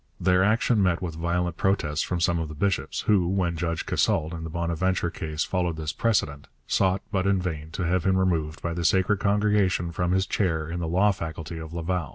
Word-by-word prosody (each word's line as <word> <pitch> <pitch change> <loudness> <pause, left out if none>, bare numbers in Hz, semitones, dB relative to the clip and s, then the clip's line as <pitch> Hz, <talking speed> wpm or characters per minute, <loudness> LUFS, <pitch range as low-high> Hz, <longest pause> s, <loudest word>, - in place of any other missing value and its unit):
Their 90 0 +3
action 110 +1 +2
met 90 -3 +2
with 90 -3 -4
violent 85 +1 -1
protests 80 -6 +1
from 90 - -2
some 85 0 +2
of 80 -2 -3
the 75 - -8
bishops, 95 +4 -1
who, 95 -5 +2
when 90 -2 0
Judge 85 0 -2
Casault 80 +2 +1
in 80 -1 -6
the 80 - -5
Bonaventure 85 +2 -1
case 80 -1 -3
followed 90 -3 -1
this 80 0 -3
precedent, 75 -11 0 0.2
sought, 95 -1 +1
but 95 -2 0
in 100 -1 +3
vain, 80 -4 -4
to 90 - -2
have 90 0 +1
him 95 -1 +2
removed 80 -4 0
by 85 - -1
the 85 0 -3
Sacred 95 +4 +2
Congregation 100 -4 +1
from 90 0 -1
his 95 +1 +2
chair 80 -5 0
in 85 +2 -4
the 85 - -2
law 95 +5 +3
faculty 80 -2 -6
of 80 -1 -8
Laval. 85 -2 -2
85 Hz, 210 wpm, -26 LUFS, 80-95 Hz, 0.2 s, Their